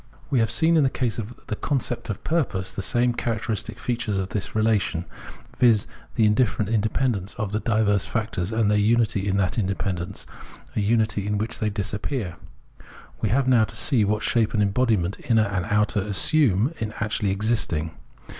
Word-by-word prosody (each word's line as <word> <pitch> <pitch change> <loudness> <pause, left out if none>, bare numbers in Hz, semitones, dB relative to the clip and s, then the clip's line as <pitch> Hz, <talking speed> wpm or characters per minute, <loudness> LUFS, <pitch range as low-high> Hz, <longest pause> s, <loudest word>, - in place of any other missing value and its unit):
We 130 - +3
have 115 -1 +2
seen 165 0 +3
in 155 - +4
the 135 - +3
case 120 -3 -2
of 115 +2 -8
the 105 - -3
concept 125 -1 -2
of 105 - -4
purpose 125 - -1
the - - -4
same 120 +5 +2
characteristic 115 -3 -3
features 120 -4 -2
of 95 0 -2
the 100 -1 -3
relation, 110 -6 +1 0.5
viz. 115 -5 +4 0.3
the 110 - +3
indifferent 105 -1 +2
independence 110 -2 0
of 105 -2 -3
the 105 - 0
diverse 105 -4 +1
factors, 105 -1 -2
and 110 -2 +2
their 105 - +3
unity 105 -2 +2
in 100 0 +1
that 100 +5 0
independence, 95 -1 -3 0.5
a - - +1
unity 110 -1 +1
in 105 0 0
which 110 +2 -3
they 110 - 0
disappear. 100 - -3 0.8
We 110 - +1
have 130 +5 +2
now 120 -4 +5
to 115 - -8
see 120 -1 +3
what 105 +1 0
shape 115 -2 +1
and 105 - +3
embodiment 100 -3 +1
inner 110 -2 +5
and 95 -3 -2
outer 105 +2 +1
assume 115 - +2
in 110 -1 -3
actually 110 -2 -1
existing. 95 -6 0
110 Hz, 175 wpm, -24 LUFS, 100-115 Hz, 0.8 s, now